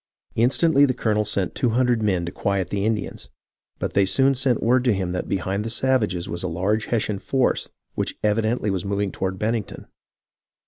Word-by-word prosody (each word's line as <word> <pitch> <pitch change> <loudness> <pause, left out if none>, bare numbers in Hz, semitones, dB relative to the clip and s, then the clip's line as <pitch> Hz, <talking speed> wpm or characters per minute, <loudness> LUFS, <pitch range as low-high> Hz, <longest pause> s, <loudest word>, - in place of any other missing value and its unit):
Instantly 140 +5 +3
the 130 -3 0
colonel 105 -3 +1
sent 100 -3 -1
two 125 - 0
hundred 125 -3 +2
men 95 -5 +1
to 85 - -4
quiet 95 -3 -1
the 100 +1 0
Indians; 110 -3 -3 0.5
but - - -3
they 100 - +4
soon 135 +9 +3
sent 130 -2 +1
word 125 +2 +3
to 120 -3 +3
him 95 -2 -2
that 90 - -3
behind 95 +2 -1
the 115 - -4
savages 115 -8 0
was 85 - -4
a - - -2
large 100 +6 0
Hessian 105 -3 -1
force 130 +3 0 0.2
which - - -3
evidently 110 +1 +1
was 95 -3 -2
moving 100 0 -1
toward 95 0 -3
Bennington. 110 +1 -3
105 Hz, 185 wpm, -23 LUFS, 95-120 Hz, 0.5 s, they